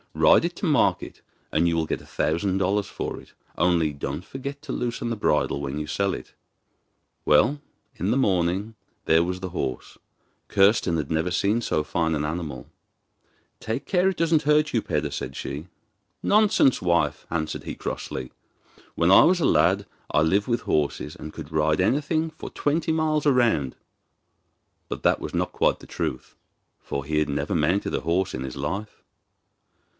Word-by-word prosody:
Ride - - +5
it - - -3
to - - -3
market - - +1 0.3
and 80 +3 +2
you 85 - +1
will 80 -1 +1
get - - -3
a - - -15
thousand 95 +4 0
dollars 100 +2 +1
for - - -5
it. - - -20 0.2
Only 85 -3 +2
don't 70 +4 -5
forget 140 +1 -7
to 140 - -5
loosen 120 -1 -2
the 115 - -1
bridle 100 -8 +1
when 70 0 -4
you 75 0 -4
sell 100 +4 0
it.' - - -10 0.9
Well, 135 - +3 0.3
in - - -1
the - - +2
morning 95 -1 +1 0.3
there 80 +1 +4
was 90 +1 -3
the 95 0 -5
horse; 65 -7 -4 0.5
Kirsten 95 -4 +3
had 75 -2 -3
never 80 +3 0
seen 100 +6 +1
so 75 -9 0
find 80 +1 0
an 75 0 -1
animal. 75 -3 -5 0.9
'Take 115 +4 -4
care 185 0 +2
it 190 - -4
doesn't 165 -2 +3
hurt 150 +1 +2
you, 115 - +2
Peder,' 75 -5 -2
said 65 -1 -5
she. 75 +5 -5 0.6
'Nonsense, 205 - +4
wife,' 85 -4 +1
answered 80 -2 -3
he - - -6
crossly. 65 -1 -5 0.6
'When 85 +2 +3
I 95 - +9
was 180 +1 +4
a 160 - +1
lad - - +3 0.2
I 75 - +2
lived 100 +6 +2
with 120 -1 0
horses, 75 -2 -1
and 75 - -8
could 75 - -9
ride 75 0 +2
anything 155 - +1
for 155 - -8
twenty 160 +3 0
miles 155 -2 +1
round.' 120 - +2 1.1
But - - -5
that - - +3
was - - -5
not - - -1
quite - - +2
the - - -13
truth, - - -4 0.5
for 70 0 -4
he 75 +1 0
had 75 - 0
never 75 +6 -1
mounted 85 +6 +1
a - - 0
horse 85 +3 0
in 65 - -4
his 65 0 -6
life. 95 +10 -4
90 Hz, 175 wpm, -25 LUFS, 75-120 Hz, 1.1 s, I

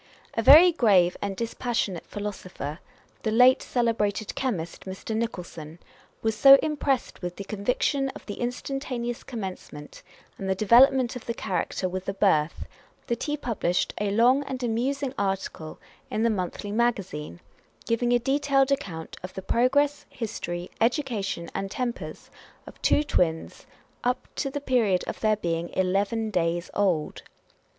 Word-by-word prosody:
A - - 0
very 315 +9 +9
grave 195 - +4
and 200 -1 -2
dispassionate 230 -5 -2
philosopher 185 -7 -6 0.4
(the 220 - -1
late 250 +4 +6
celebrated 220 -4 0
chemist, 185 -11 -3
Mr. 190 +3 -5
Nicholson) 175 -8 -5 0.5
was 220 0 +1
so 275 +5 +9
impressed 285 -4 -1
with, 180 -1 -4
the 200 - -6
conviction 250 +7 0
of - - -11
the 205 - -7
instantaneous 245 -1 -3
commencement 190 - -7 0.4
and 190 -1 -1
development 250 +4 +5
of 250 - -8
the 235 - -2
character 185 0 -2
with 185 +1 -5
the 195 - -3
birth, 165 -6 +1 0.4
that 235 0 -2
he 295 -1 -1
published 220 -9 -1
a 205 - +1
long 240 +7 +4
and 260 -2 -5
amusing 255 +4 -1
article 195 -5 -3 0.3
in 215 - -1
the 230 - +3
Monthly 200 +1 -3
Magazine, 195 - -1 0.5
giving 240 +1 +1
a 245 - +5
detailed 275 +2 +2
account 165 -12 -3
of 185 - -8
the 190 - -6
progress, 285 +6 +2
history, 180 -7 -5
education, 225 - 0
and 195 0 -3
tempers 240 +3 -5 0.3
of - - -13
two 295 - +3
twins, 165 - -1 0.4
up 250 +1 -1
to 275 - -2
the 285 +1 -4
period 230 -9 +2
of - - -5
their 215 -1 +3
being 170 -3 -2
eleven 200 +4 0
days 170 -1 -1
old. 180 -7 0
220 Hz, 145 wpm, -26 LUFS, 185-250 Hz, 0.5 s, very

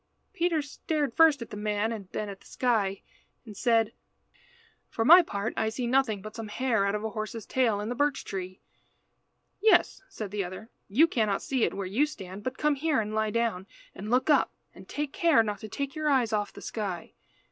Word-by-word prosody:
Peter 335 -5 +1
stared 290 -2 -2
first 310 -5 +5
at 230 - -14
the - - -6
man 210 +1 -1
and 205 -5 -6
then 215 - -3
at 195 -1 -8
the - - -17
sky, 210 -6 0 0.4
and 215 -3 -10
said 230 0 +2 1.0
"For 225 - -1
my 345 +7 +10
part, 205 - -3
I 220 - 0
see 240 +3 -3
nothing 240 -5 +1
but 215 0 -8
some 225 -2 -6
hair 225 -2 +1
out 200 - 0
of 210 - -3
a 220 - -3
horse's 215 0 -5
tail 235 -6 +1
in 210 +2 -3
the - - -1
birch 285 +2 0
tree." 185 -1 -6 1.0
"Yes," 390 -3 +4
said 215 - -6
the 205 -1 -1
other, 185 +6 -8 0.2
"you 250 +11 +5
cannot 215 -10 0
see 260 -4 +1
it - - -3
where 195 - -3
you 230 +11 +1
stand, 195 -9 -9
but 255 +4 -4
come 300 0 +2
here 295 0 +1
and 215 -1 -3
lie 220 0 +1
down, 220 -4 -1 0.3
and 205 +2 -7
look 250 +2 +2
up, 300 - +4 0.2
and - - -14
take 295 0 -3
care 330 - +4
not 210 -1 -3
to 215 - -8
take 280 +5 -4
your 310 -1 -1
eyes 250 -6 +2
off 205 -1 0
the - - -12
sky." 195 -6 -5
225 Hz, 210 wpm, -28 LUFS, 205-275 Hz, 1.0 s, my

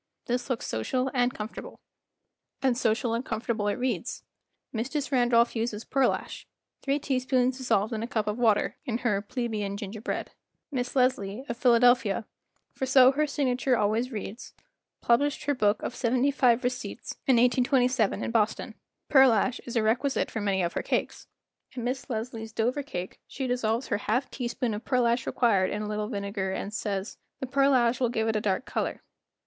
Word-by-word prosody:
This 245 +1 -2
looks 255 - -2
social 255 - -1
and 245 -1 +2
comfor 215 -1 -6
table. - - -8 0.8
And 260 -2 +3
social 230 0 +1
and 230 +2 -1
comfortable 220 -2 -2
it 205 - +1
reads. 245 -4 -2 0.5
Mistress 275 +5 -2
Randolph 240 -2 +3
uses 225 -1 -2
pearlash—three 275 +1 -2
teaspoons 255 -2 0
dissolved 220 -3 +1
in 220 - -2
a 230 - -3
cup 220 -3 -1
of 210 +3 -2
water—in 230 +2 +1
her 210 -5 0
"Plebeian 210 -3 -3
Ginger 205 +1 -6
Bread." 245 - -3
j - - -24 0.4
Miss 250 -1 -3
Leslie, 250 -3 +1
of 235 - -3
Philadelphia, 235 -3 +4 0.5
for 265 - -3
so 260 -1 +7
her 300 +2 0
signature 260 -3 +1
always 220 +4 0
reads, 215 +1 -7 0.5
published 285 +5 +2
her 290 - +1
book 210 -5 +1
of - - -3
Seventy 255 +2 +1
five 250 -3 +3
Receipts 250 0 -4
in 265 - +5
1827 250 -1 +2
in - - -2
Boston. 220 -2 0 0.3
Pearl¬ 265 -3 +7
ash 245 +4 0
is 240 - -5
a 230 - +2
requisite 245 +6 +1
for 220 - -3
many 195 -2 +1
of 170 - -1
her - - -1
cakes. - - -2 0.5
In 250 -3 -5
Miss 255 +3 -3
Leslie's 225 -1 -4
Dover 240 +6 0
Cake 185 -10 -6
she 270 - -4
dissolves 245 -1 -1
her 205 - +1
half 240 +6 -1
teaspoon 240 -2 -2
of 210 - -5
pearlash 240 -2 +1
required 200 -6 +2
in 210 +1 -3
a - - -4
little 210 0 -2
vinegar, 200 -3 -3
and 200 +2 -4
says, 200 -1 -3 0.2
"The - - -3
pearlash 260 -3 +3
will 245 -2 +2
give 225 -1 -1
it 220 - 0
a 215 - +1
dark 200 +5 0
color." - - -3
240 Hz, 175 wpm, -27 LUFS, 215-255 Hz, 0.8 s, so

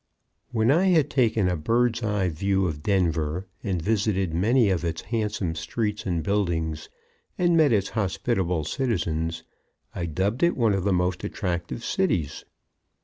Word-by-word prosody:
_ - - -51 0.5
When 115 0 +2
I 170 +6 +3
had 160 -6 +3
taken 115 -7 +2
a 90 - +1
bird's 115 +8 +1
eye 105 -4 0
view 95 +4 0
of 75 -4 -3
Denver, 85 -2 0 0.2
and 95 -3 -1
visited 95 -2 0
many 110 +5 +3
of 90 -2 -1
its 85 -1 -3
handsome 105 -6 -2
streets 105 +6 -3
and 85 -3 -1
buildings, 80 -5 -1 0.5
and 175 -1 +3
met 155 -4 +5
its 100 -3 +2
hospitable 95 -4 -1
citizens, 85 - -2 0.5
I 85 -2 -3
dubbed 95 - -1
it 170 0 +3
one 115 -4 +3
of 95 -1 -1
the 100 - +2
most 90 0 0
attractive 90 +4 -3
cities. 90 - -1
95 Hz, 155 wpm, -25 LUFS, 85-115 Hz, 0.5 s, met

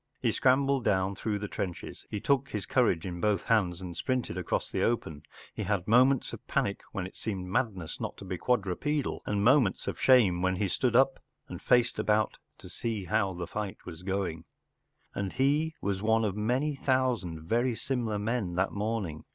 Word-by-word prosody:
He - - +1
scrambled 135 0 +3
down 95 -1 +1
through 105 +2 -2
trenches, 90 -3 -5
he 105 - -3
took 140 +4 +1
his 105 -3 -4
courage 110 -10 +2
in 90 -2 -5
both 105 -3 +1
hands 95 -6 +1
and 90 -2 -6
sprinted 125 -5 -2
across 90 -2 -1
the - - -2
open, 80 -11 -1 0.3
he - - -5
had 100 -4 -1
moments 130 +4 +4
of - - -9
panic 100 - 0
when 95 - -3
it 95 - -9
seemed 95 -4 -4
madness 95 - -2
not - - -4
to - - -10
be 95 0 -3
quad 125 -5 +2
tu 95 -2 -2
pedal, 150 +4 -2
and 105 +1 +1
m 140 +3 +7
aments 100 -6 -2
of - - -4
shame 105 -10 +5
when 95 0 +1
he 100 +2 0
stood 120 +5 0
up 135 +1 +4 0.3
and - - -8
faced 125 0 +3
about 110 0 +1 0.2
to - - -12
see 110 -5 -4
how 100 0 +1
the 90 0 -4
fight 105 +1 -4
was 80 - -8
going. 90 -4 -2 0.7
And 100 -2 -3
he 145 +5 +1
was 100 -1 -1
one 110 +1 +3
of 100 -2 -1
many 125 +8 0
thousand 125 - 0
very 120 +7 +1
similar 115 -4 -2
men 105 -4 -2
that 95 +2 +1
morning. 100 -7 -3
105 Hz, 195 wpm, -29 LUFS, 95-125 Hz, 0.7 s, m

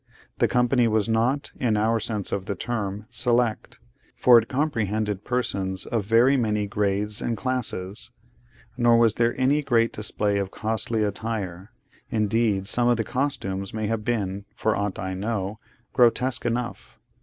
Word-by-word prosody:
The - - +4
company 125 0 +2
was 110 -2 +1
not, 115 +5 0
in 115 -4 +1
our 110 +2 +2
sense 110 -3 -3
of 95 -1 -2
the 100 - -3
term, 105 -2 -3
select, 120 -1 0 0.4
for 120 -2 +7
it 115 - -6
comprehended 110 -8 -1
persons 100 -7 -2
of 110 -4 -2
very 120 +5 +5
many 105 -4 0
grades 105 0 -1
and 115 -2 -2
classes; 120 -5 -3 0.7
nor 120 -1 +5
was 115 -2 +4
there 120 +2 0
any 140 +3 +3
great 115 -5 +2
display 105 -1 -1
of 100 -1 -2
costly 110 +1 -2
attire: 100 -3 -4 0.4
indeed, 105 -2 +1
some 120 +4 +3
of 120 -1 +3
the 115 - 0
costumes 110 -7 -3
may 110 -1 -2
have 110 0 -2
been, 100 -4 -2
for 110 0 0
aught 100 -1 -2
I 95 0 -4
know, 100 +1 -3 0.3
grotesque 125 +1 +2
enough. 120 +1 -4
110 Hz, 155 wpm, -25 LUFS, 100-120 Hz, 0.7 s, for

